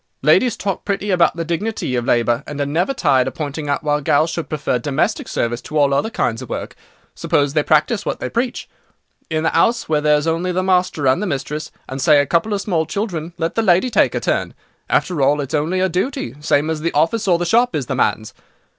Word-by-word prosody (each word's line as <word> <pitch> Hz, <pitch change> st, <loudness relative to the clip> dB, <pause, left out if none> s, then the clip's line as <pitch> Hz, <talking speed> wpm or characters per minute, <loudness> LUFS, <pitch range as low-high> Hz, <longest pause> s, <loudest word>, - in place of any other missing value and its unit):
Ladies 240 Hz, -4 st, +3 dB
talk 195 Hz, -1 st, -3 dB
pretty 200 Hz, 0 st, -2 dB
about 175 Hz, -3 st, +3 dB
the 165 Hz, -, -2 dB
dignity 170 Hz, -, -2 dB
of 120 Hz, -1 st, -1 dB
labour, 120 Hz, +2 st, +1 dB
and 145 Hz, -1 st, -6 dB
are 145 Hz, -, +1 dB
never 165 Hz, -, 0 dB
tired 135 Hz, -, +2 dB
of -, -, -5 dB
pointing 145 Hz, -1 st, -4 dB
out 140 Hz, -, -1 dB
why 150 Hz, -1 st, 0 dB
gals 155 Hz, +3 st, +2 dB
should 170 Hz, -, -4 dB
prefer 145 Hz, -5 st, -1 dB
domestic 155 Hz, -, -1 dB
service 120 Hz, +1 st, -2 dB
to 155 Hz, -, -5 dB
all 140 Hz, -2 st, +3 dB
other 140 Hz, +10 st, +1 dB
kinds 115 Hz, -, -1 dB
of -, -, -9 dB
work. -, -, -5 dB, 0.4 s
Suppose 145 Hz, -1 st, 0 dB
they 150 Hz, -, +3 dB
practise 155 Hz, +8 st, +2 dB
what -, -, -3 dB
they -, -, -3 dB
preach. 240 Hz, +1 st, -2 dB, 0.6 s
In 155 Hz, -1 st, -1 dB
the 160 Hz, -, 0 dB
'ouse, 230 Hz, 0 st, +2 dB
where 150 Hz, -1 st, +1 dB
there's 150 Hz, 0 st, +2 dB
only 165 Hz, +3 st, 0 dB
the 185 Hz, +1 st, -1 dB
master 180 Hz, -5 st, +1 dB
and 130 Hz, +8 st, +3 dB
the 210 Hz, -, -1 dB
mistress, 150 Hz, 0 st, -4 dB, 0.2 s
and, 135 Hz, +1 st, -5 dB
say 145 Hz, +2 st, +5 dB
a 145 Hz, -, +2 dB
couple 170 Hz, +8 st, 0 dB
of 200 Hz, -1 st, -1 dB
small 165 Hz, -6 st, -1 dB
children, 170 Hz, -3 st, -4 dB
let 165 Hz, -1 st, -2 dB
the 225 Hz, -, +1 dB
lady 190 Hz, +4 st, +3 dB
take -, -, +3 dB
her -, -, 0 dB
turn. -, -, -1 dB, 0.3 s
After 175 Hz, -6 st, +1 dB
all, 145 Hz, +2 st, +3 dB
it's 140 Hz, -2 st, -4 dB
only 155 Hz, +5 st, 0 dB
her 190 Hz, -, +3 dB
duty, 180 Hz, -, -2 dB
same 150 Hz, +1 st, +1 dB
as 155 Hz, -1 st, -3 dB
the 170 Hz, +1 st, -1 dB
office 195 Hz, +9 st, +1 dB
or 175 Hz, -2 st, +4 dB
the 175 Hz, -, -2 dB
shop 235 Hz, +6 st, +2 dB
is 140 Hz, -, -1 dB
the -, -, -3 dB
man's. 110 Hz, -1 st, -1 dB
160 Hz, 235 wpm, -19 LUFS, 145-185 Hz, 0.6 s, say